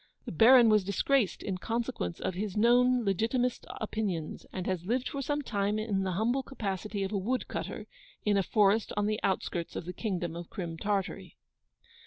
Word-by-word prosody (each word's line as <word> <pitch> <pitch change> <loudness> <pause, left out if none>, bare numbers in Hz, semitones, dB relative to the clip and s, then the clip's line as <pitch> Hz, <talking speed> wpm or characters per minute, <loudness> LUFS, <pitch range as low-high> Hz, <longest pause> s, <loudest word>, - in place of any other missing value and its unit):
The - - -5
Baron 235 +7 +7
was 215 -2 +4
disgraced 200 +4 +1
in 190 -3 -3
consequence 225 - -3
of - - -2
his 195 +2 -3
known 245 +2 +4
legitimist 230 +6 0
opinions, 205 -7 -3
and 185 -1 -4
has 180 -2 -2
lived 250 +3 0
for 280 - -4
some 290 +2 -1
time 205 -3 0
in 215 -3 -1
the 190 -1 -1
humble 235 +8 +1
capacity 205 -5 -4
of 190 - -3
a 205 - 0
wood 250 +7 -1
cutter, - - -5 0.4
in 210 -1 +3
a 200 - +4
forest 210 +2 +2
on 205 - +2
the 215 0 0
outskirts 175 -3 -2
of - - -4
the 180 - -5
Kingdom 180 -7 -3
of 170 0 -7
Crim 170 -4 -5
Tartary. 195 +2 -3
205 Hz, 185 wpm, -30 LUFS, 185-230 Hz, 0.4 s, Baron